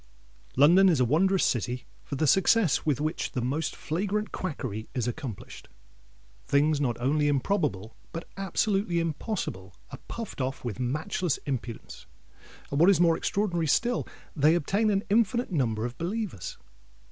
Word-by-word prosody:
London 175 Hz, +8 st, +6 dB
is 160 Hz, -6 st, +2 dB
a 125 Hz, -, +4 dB
wondrous 185 Hz, +9 st, +3 dB
city 125 Hz, +1 st, -1 dB, 0.2 s
for -, -, -5 dB
the 155 Hz, -, +1 dB
success 190 Hz, 0 st, +3 dB
with 145 Hz, -2 st, +2 dB
which 155 Hz, +2 st, -2 dB
the 125 Hz, -, -1 dB
most 145 Hz, +5 st, -1 dB
flagrant 200 Hz, +6 st, -2 dB
quackery 125 Hz, -, -4 dB
is 125 Hz, -2 st, -1 dB
accomplished. 120 Hz, -5 st, -7 dB, 0.7 s
Things 145 Hz, +1 st, +2 dB
not 120 Hz, -4 st, 0 dB
only 145 Hz, +4 st, +1 dB
improbable, 140 Hz, -, 0 dB, 0.2 s
but 165 Hz, 0 st, -6 dB
absolutely 195 Hz, -1 st, 0 dB
impossible, 155 Hz, -, -3 dB, 0.2 s
are -, -, -8 dB
puffed 230 Hz, -11 st, -6 dB
off 130 Hz, 0 st, -3 dB
with 120 Hz, -1 st, -4 dB
matchless 150 Hz, +5 st, -1 dB
impudence; 125 Hz, -5 st, -5 dB, 0.6 s
and, 140 Hz, -, 0 dB
what 170 Hz, +4 st, +7 dB
is 195 Hz, -, +4 dB
more 170 Hz, -2 st, +5 dB
extraordinary 175 Hz, -5 st, -1 dB
still, 240 Hz, -, +1 dB, 0.3 s
they 155 Hz, +2 st, +4 dB
obtain 200 Hz, +7 st, +1 dB
an 200 Hz, -1 st, +1 dB
infinite 235 Hz, +2 st, +2 dB
number 115 Hz, -8 st, 0 dB
of 120 Hz, +1 st, -6 dB
believers. 180 Hz, -, -4 dB
155 Hz, 145 wpm, -28 LUFS, 130-195 Hz, 0.7 s, what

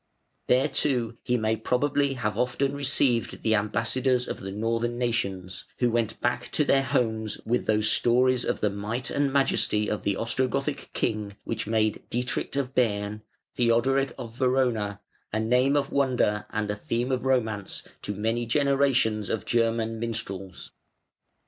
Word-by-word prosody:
There 130 Hz, +3 st, +4 dB
too 120 Hz, -6 st, 0 dB
he 125 Hz, -, 0 dB
may 110 Hz, -1 st, +1 dB
probably 140 Hz, +5 st, +1 dB
have 110 Hz, -5 st, -2 dB
often 130 Hz, +3 st, 0 dB
received 135 Hz, -4 st, +1 dB
the 110 Hz, -, +3 dB
ambassadors 115 Hz, +4 st, +1 dB
of -, -, -4 dB
the 95 Hz, 0 st, -6 dB
Northern 115 Hz, +3 st, -1 dB
nations, 100 Hz, -5 st, -2 dB
who 120 Hz, -2 st, +2 dB
went 115 Hz, -1 st, -1 dB
back 120 Hz, 0 st, 0 dB
to 150 Hz, -, +3 dB
their 135 Hz, -1 st, +4 dB
homes 110 Hz, -5 st, -1 dB
with 120 Hz, +2 st, 0 dB
those 110 Hz, 0 st, +2 dB
stories 125 Hz, +1 st, +3 dB
of -, -, -2 dB
the 105 Hz, -, +2 dB
might 105 Hz, +5 st, -3 dB
and 140 Hz, -1 st, +1 dB
majesty 135 Hz, -6 st, +2 dB
of 105 Hz, -, -2 dB
the 100 Hz, -, 0 dB
Ostrogothic 130 Hz, +6 st, -1 dB
king 105 Hz, -2 st, -2 dB
which 110 Hz, -2 st, -3 dB
made 110 Hz, -1 st, +1 dB
"Dietrich 125 Hz, +3 st, -2 dB
of 135 Hz, -2 st, -1 dB
Bern" 105 Hz, -4 st, 0 dB, 0.3 s
(Theodoric 130 Hz, +3 st, +2 dB
of 115 Hz, -3 st, -8 dB
Verona) 125 Hz, -6 st, +1 dB, 0.3 s
a 110 Hz, -, 0 dB
name 125 Hz, +5 st, +3 dB
of 140 Hz, -1 st, -1 dB
wonder 120 Hz, -6 st, +1 dB
and 105 Hz, -1 st, -2 dB
a -, -, -2 dB
theme 120 Hz, +5 st, -2 dB
of 130 Hz, -1 st, 0 dB
romance 110 Hz, -7 st, -1 dB, 0.2 s
to 105 Hz, -, -4 dB
many 115 Hz, +3 st, -1 dB
generations 135 Hz, -5 st, +2 dB
of 110 Hz, -, -2 dB
German 115 Hz, -1 st, 0 dB
minstrels. 100 Hz, -5 st, -5 dB
115 Hz, 155 wpm, -26 LUFS, 110-130 Hz, 0.3 s, There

